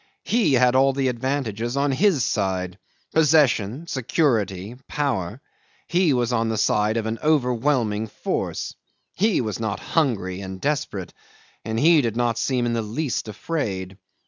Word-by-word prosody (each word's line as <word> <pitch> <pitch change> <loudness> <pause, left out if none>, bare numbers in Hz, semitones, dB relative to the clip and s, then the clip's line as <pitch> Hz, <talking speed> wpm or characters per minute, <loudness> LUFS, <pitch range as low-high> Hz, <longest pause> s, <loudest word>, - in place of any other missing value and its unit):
He 220 - +2
had 125 0 +4
all 135 +1 +4
the 135 -1 +1
advantages 120 -2 -2
on 140 0 +2
his 155 - +3
side 95 -2 -1 0.3
possession, 145 -5 +3
security, 115 - 0
power; 125 -6 -2 0.5
he 175 -2 +3
was 125 -2 +1
on 115 -1 +1
the 110 - -1
side 105 +1 +2
of 110 - -1
an 110 +1 -3
overwhelming 125 -6 +1
force! - - -3 0.4
He 210 -3 +2
was 110 -3 -3
not 110 -3 -2
hungry 100 - -1
and 95 -1 -7
desperate, 145 -10 -2 0.5
and 110 0 -2
he 160 +2 +6
did 115 -3 -2
not 120 -1 +1
seem 125 -2 0
in 120 - 0
the 115 - 0
least 120 +5 -3
afraid. 100 - -4
120 Hz, 145 wpm, -23 LUFS, 105-145 Hz, 0.5 s, he